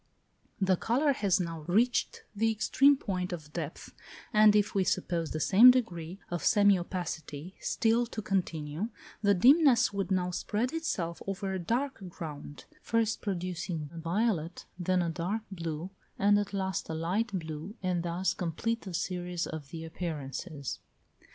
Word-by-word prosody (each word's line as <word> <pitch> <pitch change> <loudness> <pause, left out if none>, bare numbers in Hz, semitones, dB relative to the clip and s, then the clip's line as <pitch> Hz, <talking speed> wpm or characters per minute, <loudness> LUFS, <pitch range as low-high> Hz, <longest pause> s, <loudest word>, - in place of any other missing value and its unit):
The 190 -2 +3
colour 275 - +2
has 200 -6 +2
now 165 -3 -3
reached 230 +7 +1
the 225 +2 +2
extreme 275 +6 +4
point 185 -6 -3
of 155 -4 -7
depth, 160 -2 -6 0.4
and 215 -1 +7
if 210 0 +2
we 195 - +2
suppose 170 -3 -1
the 155 - -3
same 210 +10 +8
degree 180 -9 +1
of 175 -3 -2
semi 205 -3 +5
opacity 175 -2 -5
still 235 +1 +1
to 225 - -6
continue, 170 -1 -2 0.3
the 200 -1 +4
dimness 265 - +5
would 195 -1 -2
now 180 -2 +1
spread 220 - -1
itself 185 - -2
over 195 0 -2
a 190 - -2
dark 245 +10 -1
ground, 150 -4 -8 0.2
first 225 -1 0
producing 175 -5 -3
a 165 - -7
violet, 175 -1 -1
then 180 0 +1
a 170 - -1
dark 190 +7 -2
blue, 170 -1 -4 0.3
and 205 +1 +4
at 205 - -3
last 190 -2 -2
a 160 - -2
light 185 +8 -1
blue, 160 +4 -6
and 180 -2 0
thus 175 +2 -1
complete 225 +7 -2
the 185 -3 -6
series 175 0 -2
of 155 -4 -7
the 160 +1 -7
appearances. 155 -2 -5
185 Hz, 155 wpm, -30 LUFS, 165-210 Hz, 0.4 s, same